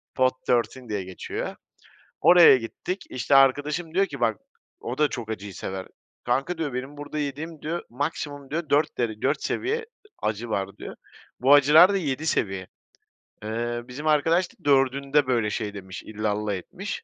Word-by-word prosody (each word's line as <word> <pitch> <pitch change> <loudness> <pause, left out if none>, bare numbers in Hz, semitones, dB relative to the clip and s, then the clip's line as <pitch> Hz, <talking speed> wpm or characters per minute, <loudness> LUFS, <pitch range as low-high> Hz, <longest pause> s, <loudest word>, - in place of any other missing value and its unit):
Pot 130 0 +3
thirteen 125 0 0
diye 105 -3 -2
geçiyor. 95 0 -5 0.7
Oraya 175 -6 +8
gittik, 155 - -5
işte 130 +3 +1
arkadaşım 145 +5 +3
diyor 195 +2 +3
ki 140 -8 -8
bak 115 -3 +1 0.4
o 120 +2 -5
da 150 - +4
çok 120 -6 -6
acıyı 105 -2 -5
sever. 95 +1 -5 0.4
Kanka 135 +8 0
diyor 155 -5 -3
benim 130 +3 -5
burada 145 +1 -5
yediğim 150 +2 -5
diyor 170 +3 -3
maksimum 145 +1 -4
diyor 155 0 -3
4 145 +2 +2
dere 110 -3 -2
4 140 +3 0
seviye 445 +5 -1 0.4
acı 110 +2 -2
var 100 -2 -3
diyor. - - -8 0.4
Bu 135 +3 +5
acılar 150 +7 +7
da - - +2
7 155 -4 -2
seviye. 95 - -1 0.8
Eee, 120 +2 -2
bizim 145 +5 -6
arkadaş 165 +4 +3
da - - -27
4'ünde 140 +1 +3
böyle 120 -4 +1
şey 105 -1 -3
demiş, 95 0 -8
illallah 105 -1 -2
etmiş. 90 -2 -6
135 Hz, 160 wpm, -25 LUFS, 110-150 Hz, 0.8 s, Oraya